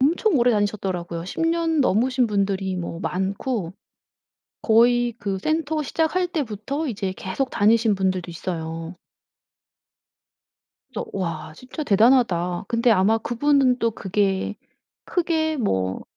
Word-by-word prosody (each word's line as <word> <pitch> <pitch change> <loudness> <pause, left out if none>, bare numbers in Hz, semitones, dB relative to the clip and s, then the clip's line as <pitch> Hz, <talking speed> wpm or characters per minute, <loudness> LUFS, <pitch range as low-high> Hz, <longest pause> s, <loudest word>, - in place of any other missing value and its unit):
엄청 340 - +2
오래 245 +1 +4
다니셨더라고요. 190 -6 -2
10년 330 - 0
넘으신 255 +2 +2
분들이 195 -2 -1
뭐 170 -1 -5
많고 190 +1 -2 0.9
거의 240 +1 +4
그 200 -3 -3
센터 310 +4 -1
시작할 325 +5 0
때부터 280 - -3
이제 195 -5 -3
계속 250 +8 -3
다니신 220 0 +3
분들도 185 -2 -1
있어요. 165 0 -5 2.0
그래서 220 - -3
'와 165 -5 -4
진짜 255 - -7
대단하다.' 200 -7 +3
근데 235 0 +2
아마 210 +2 +4
그분은 255 +2 +2
또 230 -1 +1
그게 195 0 -1 0.5
크게 320 -3 0
뭐 95 - -1
215 Hz, 250 characters per minute, -23 LUFS, 190-265 Hz, 2.0 s, 오래